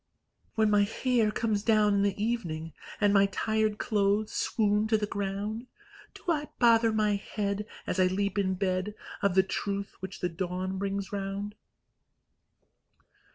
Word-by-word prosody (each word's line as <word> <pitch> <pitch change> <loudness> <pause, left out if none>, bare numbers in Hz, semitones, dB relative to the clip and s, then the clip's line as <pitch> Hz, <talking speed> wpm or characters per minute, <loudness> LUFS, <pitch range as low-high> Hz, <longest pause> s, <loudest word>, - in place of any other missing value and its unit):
When 220 -1 +3
my 205 0 +5
hair 225 +2 +1
comes 210 -1 0
down 215 -1 +4
in 200 - +3
the 200 0 0
evening, 170 -9 -2 0.3
And 205 -1 +4
my 200 -1 +5
tired 215 +1 0
clothes 210 0 +1
swoon 210 -1 +1
to 220 0 +3
the 210 - -1
ground, 205 +4 -3 0.5
Do - - -13
I 300 -3 +1
bother 230 -1 +5
my 210 -1 +2
head, 200 0 -3 0.2
As 185 - -2
I 185 - +5
leap 200 +2 0
in 190 -1 +1
bed, 185 +2 -1 0.3
Of 200 -2 +2
the 190 - +6
truth 200 +1 -3
which 190 0 -7
the 180 - 0
dawn 185 +2 -3
brings 200 0 -2
round? 200 +1 -3
205 Hz, 155 wpm, -29 LUFS, 195-215 Hz, 0.5 s, the